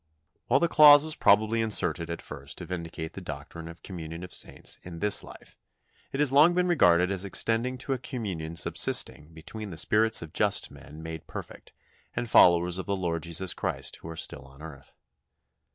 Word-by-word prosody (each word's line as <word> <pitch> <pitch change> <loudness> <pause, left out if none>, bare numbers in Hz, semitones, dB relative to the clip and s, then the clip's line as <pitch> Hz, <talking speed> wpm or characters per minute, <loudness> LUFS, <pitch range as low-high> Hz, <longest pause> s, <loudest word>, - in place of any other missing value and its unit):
" 85 - -49
While 130 +3 +3
the 170 - +2
clause 150 -2 +8
was 155 -1 +2
probably 110 +2 +3
inserted 90 -6 +1
at 85 - -6
first - - -7
to - - -5
vindicate 85 -2 -6
the 95 - -8
doctrine 80 +1 -8
of 85 +1 -12
communion 85 -2 -8
of 90 - -9
saints - - -3
in 85 -2 -10
this 105 +3 +2
life, - - -15 0.5
it 135 - -5
has 145 -3 +2
long 155 +5 +6
been 180 0 +1
regarded 90 - +3
as 95 -1 -3
extending 115 +5 0
to 135 +2 -3
a 130 - -4
communion 95 - -6
subsisting 75 -1 0
between 100 +7 -9
the 85 - -8
spirits 110 +5 +2
of 80 - -12
just - - +1
men 75 +2 -13
made 80 -1 -8
perfect - - -10 0.4
and 120 - -3
followers 85 +1 +5
of - - -6
the 100 -1 -1
Lord 85 -3 -2
Jesus 85 +2 -1
Christ - - -3
who 80 - -11
are 80 - -7
still 65 - -5
on 70 +3 -16
earth. 70 -4 -12
90 Hz, 195 wpm, -27 LUFS, 80-115 Hz, 0.5 s, clause